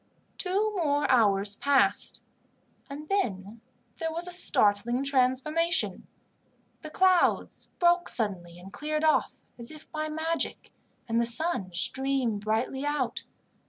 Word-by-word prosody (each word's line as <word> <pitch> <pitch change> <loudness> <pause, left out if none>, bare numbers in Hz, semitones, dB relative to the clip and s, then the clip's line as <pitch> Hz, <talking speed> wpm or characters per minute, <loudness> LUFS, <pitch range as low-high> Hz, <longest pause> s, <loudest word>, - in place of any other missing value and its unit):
Two 405 +3 0
more 295 -5 0
hours 205 -4 +3
passed, 280 +4 +1 0.7
and 295 +2 -8
then 220 - -3 0.4
there 325 -1 -2
was 335 +2 -2
a - - -5
startling 240 - +3
transformation. 280 +5 +1 0.7
The 310 - -8
clouds 370 +2 +1
broke 350 0 +2
suddenly 180 -7 -1
and 185 +2 -13
cleared 305 +1 -3
off, 310 -1 +1 0.2
as 235 - -7
if 310 0 -12
by 310 0 -4
magic, 320 +2 -3 0.4
and 230 0 +1
the 235 - 0
sun 235 - 0
streamed 260 0 +1
brightly 225 +5 -2
out. 290 -4 -2
275 Hz, 125 wpm, -27 LUFS, 225-320 Hz, 0.7 s, hours